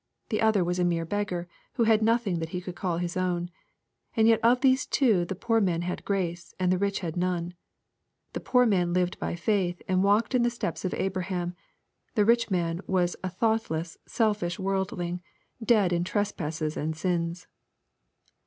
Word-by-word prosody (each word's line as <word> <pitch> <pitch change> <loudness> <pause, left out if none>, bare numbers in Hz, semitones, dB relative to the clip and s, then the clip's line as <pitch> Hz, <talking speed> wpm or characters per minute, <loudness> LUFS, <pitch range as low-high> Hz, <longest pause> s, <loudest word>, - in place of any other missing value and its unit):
'* - - -48
The 215 - 0
other 220 -4 +3
was 175 +1 -1
a - - +3
mere 170 -1 +1
*^ - - -15
beggar," 205 -4 -2 0.3
who 235 - +1
had 220 -1 +4
nothing 220 -5 +2
that 160 0 -4
he 180 - -3
could 180 0 -7
call 180 -3 -2
his 175 0 -3
own. 175 -1 -1 0.7
And 220 0 +5
yet 225 -1 +5
of 240 +2 +4
these 265 0 +3
two 215 -11 +3
the 190 - -4
poor 225 +3 +1
man 175 -4 +1
had 180 +1 -4
grace, 175 -4 -3
and 180 -1 +2
the 185 - +1
rich 200 0 0
had 165 -4 -4
none. 180 -1 -1 0.8
The - - -3
poor 250 -1 +3
man 180 -6 +2
lived 180 0 0
by - - -2
faith, 180 -2 0
and 185 0 +2
walked 205 +5 +3
in 250 - +3
the 240 - +3
steps 235 - -4
of 185 - -1
Abraham. 180 -2 -2 0.6
The 210 -3 +4
rich 235 +1 +3
man 170 -2 -1
was 180 -2 +1
a 185 - -1
thoughtless, 185 -5 -1
selfish 210 -6 0
worldling, 190 -3 -2 0.4
dead 210 -6 +3
in 170 0 +1
trespasses 165 -6 -2
and 155 +1 -3
sins. 170 0 -1
185 Hz, 190 wpm, -27 LUFS, 175-215 Hz, 0.8 s, And